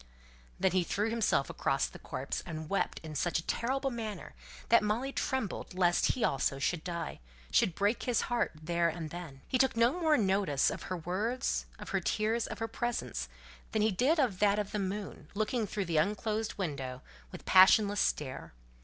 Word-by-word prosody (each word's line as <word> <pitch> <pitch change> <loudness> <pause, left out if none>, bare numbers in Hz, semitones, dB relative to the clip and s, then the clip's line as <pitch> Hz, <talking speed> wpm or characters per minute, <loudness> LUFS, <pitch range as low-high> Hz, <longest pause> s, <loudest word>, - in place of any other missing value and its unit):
Then 190 - +3
he 185 0 +2
threw 210 +6 -1
himself 230 -1 +2
across - - 0
the - - -9
corpse, - - -4
and 160 -3 -6
wept 200 - 0
in 155 -1 -7
such 170 +3 0
a 165 - -4
terrible 270 +3 -1
manner 220 -6 -5 0.4
that 235 - +7
Molly 225 +6 -1
trembled 245 -7 -2
lest 175 -1 +3
he 250 - -3
also 135 0 +1
should 155 +4 -1
die 170 -2 -4 0.3
should 175 - +3
break 205 +4 +1
his 245 -3 +1
heart 240 -1 0
there 170 +1 +1
and 160 -1 -5
then. 165 -6 -8
He 255 - 0
took 265 -3 +3
no 235 +1 +5
more 315 -3 +4
notice 190 - +2
of - - -6
her 185 - -2
words, 210 +10 -1
of - - -9
her - - +1
tears, 220 +2 0
of - - -6
her 225 - -2
presence, 225 - -3 0.4
than 215 -1 +2
he 220 - +3
did 255 - +2
of 240 -11 +1
that 205 0 +4
of 205 -1 -2
the 210 - -1
moon, 195 -5 -4
looking 215 +1 0
through 200 0 -2
the 170 -2 0
unclosed 215 +5 0
window, 135 -8 -4 0.3
with - - -10
passionless 200 +2 +6
stare. 130 - -1
200 Hz, 190 wpm, -31 LUFS, 170-225 Hz, 0.4 s, that